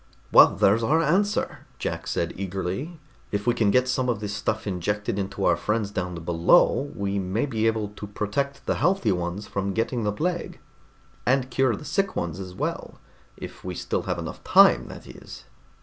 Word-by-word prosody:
"Well, - - +8
there's 105 +4 +3
our 150 +8 +3
answer," 190 +7 0
Jack - - -4
said 85 - -1
eagerly. 95 - -4 0.3
"If 100 0 -2
we 120 - +3
can 110 -3 +2
get 125 +5 +3
some 125 0 0
of 115 -4 0
this 105 -1 -4
stuff 110 +1 -2
injected 100 +2 -2
into 100 0 -3
our 90 - +4
friends 105 +4 -1
down 90 -3 -3
below, 85 +11 +3
we 100 -1 -1
may 95 +7 -1
be 115 -5 0
able 110 -2 0
to 105 0 -9
protect 120 +8 -3
the - - 0
healthy 180 - +2
ones 90 +3 -3
from 100 0 -3
getting 115 +1 -1
the 105 - +1
plague, 170 - -3 0.6
and 130 0 +1
cure 130 -3 +2
the 150 - -10
sick 195 +7 -1
ones 85 +1 -3
as 90 -1 -7
well. - - -4 0.4
If - - -9
we 90 -1 -5
still - - -2
have - - 0
enough - - -7
time, - - +6
that - - -10
is." - - -11
105 Hz, 185 wpm, -25 LUFS, 95-130 Hz, 0.6 s, Well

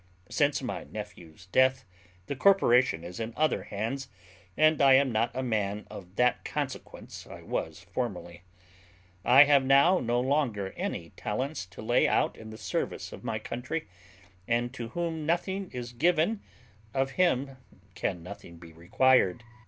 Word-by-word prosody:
Since 145 -2 +1
my 125 - -4
nephew's 90 -6 -10
death, 130 0 +3 0.4
the 140 - -4
corporation 130 - +4
is 90 +5 -8
in 115 0 -5
other 155 0 +1
hands; 115 +6 -4 0.5
and 155 -1 +4
I 135 -1 +7
am 135 -1 +3
not 115 +1 +1
a 130 - -2
man 105 -3 -1
of 90 -1 -10
that 125 +2 +2
consequence - - -6
I - - -11
was - - -4
formerly. 85 0 -5 0.8
I 130 +7 +8
have 140 -2 +4
now 140 +8 +5
no 120 0 0
longer 125 -8 0
any - - -5
talents 130 -1 -4
to 90 - -11
lay - - +3
out - - +1
in 110 - -11
the 110 - -9
service - - -3
of - - -10
my 110 -1 -2
country; 125 +8 -5 0.6
and 120 +1 0
to 120 -3 -5
whom 165 +2 -3
nothing 190 +3 -1
is 125 -1 -7
given, 170 - +2 0.5
of 135 0 +1
him 140 -7 +1 0.4
can 90 -1 -3
nothing 85 -2 -10
be 85 -1 -13
required. 100 +4 +2
125 Hz, 150 wpm, -29 LUFS, 105-140 Hz, 0.8 s, I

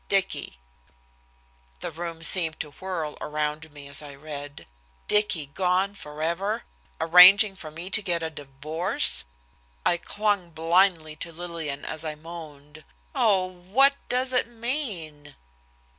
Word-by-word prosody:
DICKY." 195 - 0 1.2
The - - -4
room 165 0 -6
seemed 165 -2 +3
to 150 - -7
whirl 165 -2 -5
around 150 +1 -3
me 145 -1 -11
as 140 +1 0
I 145 -2 -10
read. 145 -1 -8 0.4
Dicky 210 -7 +2
gone 185 +6 0
forever, 170 +4 -3 0.4
arranging 190 +4 +8
for 165 -5 -9
me 170 +5 -6
to 210 - +2
get 175 -4 -1
a 160 - -3
divorce! 150 +4 -1 0.6
I 175 - +3
clung 205 -1 -1
blindly 165 -1 +2
to 165 - -4
Lillian 165 -4 -5
as 155 0 -5
I 155 -1 -4
moaned: 155 -2 -11 0.3
"Oh, 195 -4 +3
what 190 +10 +3 0.2
does 255 +1 0
it 250 - +2
mean?" 215 - -4
165 Hz, 130 wpm, -26 LUFS, 150-190 Hz, 1.2 s, arranging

